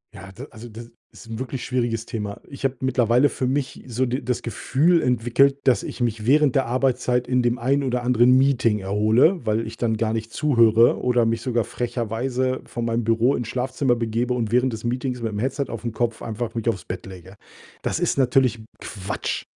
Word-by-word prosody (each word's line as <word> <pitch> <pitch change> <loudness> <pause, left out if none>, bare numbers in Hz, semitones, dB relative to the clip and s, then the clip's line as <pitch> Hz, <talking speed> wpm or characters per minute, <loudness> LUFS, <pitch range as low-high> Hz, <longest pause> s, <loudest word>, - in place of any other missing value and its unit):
Ja, 95 +1 -10
d 125 +8 -10
also, 115 +1 -11
d 115 +2 -10 0.2
ist 115 - -14
'n 110 - -5
wirklich 130 0 -5
schwieriges 120 -3 -1
Thema. 105 -2 -5
Ich 140 -1 -11
habe 135 - 0
mittlerweile 125 +1 +3
für 130 - -3
mich 135 0 -2
so 125 +2 0
de 125 +3 -2
das 125 0 -2
Gefühl 160 +8 +1
entwickelt, 125 +3 +2
dass 130 -3 +3
ich - - -7
mich 110 -2 -1
während 140 +1 +4
der 135 - +2
Arbeitszeit 125 0 0
in 125 0 +2
dem 120 0 +1
einen 140 +4 +1
oder 125 -2 -1
anderen 125 +1 +4
Meeting 130 -5 +2
erhole, 110 - +2
weil 110 +1 0
ich - - -9
dann 110 -2 0
gar 110 0 0
nicht 110 0 -4
zuhöre 115 -6 +4
oder 125 -2 +2
mich 115 0 0
sogar 120 -3 0
frecherweise 125 +2 -2
von 120 0 -5
meinem 115 0 0
Büro 115 +4 +2
ins 120 - -4
Schlafzimmer 130 0 0
begebe 115 +2 -1
und 115 -3 -2
während 125 +1 +2
des 110 - -7
Meetings 125 0 -2
mit'm 110 -3 -3
Headset 135 +2 -1
aufm 115 0 -4
Kopf 115 0 -2
einfach 115 +1 -5
mich 115 0 -3
aufs 100 -5 -3
Bett 90 - -6
lege. 95 +1 -11 0.5
Das - - -2
ist - - 0
natürlich 130 -2 +2 0.2
Quatsch. 95 -2 -4
120 Hz, 200 wpm, -23 LUFS, 115-130 Hz, 0.5 s, während